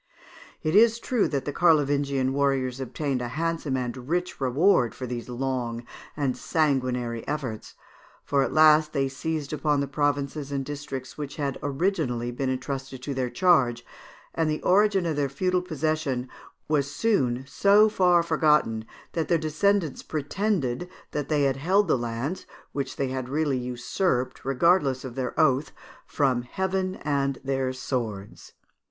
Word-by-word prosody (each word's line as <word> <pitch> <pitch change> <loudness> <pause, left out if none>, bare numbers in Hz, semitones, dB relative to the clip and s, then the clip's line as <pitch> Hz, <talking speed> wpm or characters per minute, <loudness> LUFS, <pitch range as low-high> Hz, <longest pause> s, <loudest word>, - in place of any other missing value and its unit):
It 155 +3 0
is 225 +2 +6
true 235 -1 0
that 140 -3 -2
the 145 - -3
Carlovingian 140 -5 +2
warriors 135 -2 0
obtained 135 0 -2
a 120 - -2
handsome 160 0 -2
and 125 +1 -5
rich 175 -2 -1
reward 130 - +3
for 130 - -5
these 120 0 -5
long 120 -2 -3 0.3
and 140 -4 0
sanguinary 130 -7 0
efforts, 135 -7 -4 0.5
for 140 -1 +1
at - - 0
last 155 0 +5
they 135 -2 +1
seized 150 +2 -4
upon 150 -1 +1
the 140 - -1
provinces 145 0 -1
and 135 -1 -2
districts 140 -1 -6
which 145 -1 -5
had 140 -3 -3
been 145 - -2
originally 135 -7 -1
entrusted 135 0 -3
to 140 - -3
their 130 -2 -1
charge, 130 -9 +3 0.5
and 165 -1 0
the 155 - -1
origin 195 0 +3
of 160 -3 -1
their 140 -2 +1
feudal 180 +6 0
possession 155 -6 -2 0.4
was 145 -2 +1
soon 135 - 0
so 205 +7 +5
far 180 -5 +3
forgotten, 150 -9 +2 0.3
that 165 -2 -2
their 170 - +3
descendants 160 +1 0
pretended 160 - -2 0.2
that 145 -2 -3
they 150 -2 +2
held 165 +10 +2
the - - +3
lands, 120 +8 -3 0.2
which 140 -1 -3
they 135 -2 -1
had 130 -1 -4
really 145 -2 0
usurped 125 +2 -1
regardless 135 -1 +2
of 130 - -6
their 130 -1 -3
oath, 140 -1 +3 0.4
from 130 -4 +1
heaven 190 +7 -2
and 140 -2 0
their 135 -1 -1
swords. 115 -6 -5
140 Hz, 150 wpm, -26 LUFS, 130-160 Hz, 0.5 s, is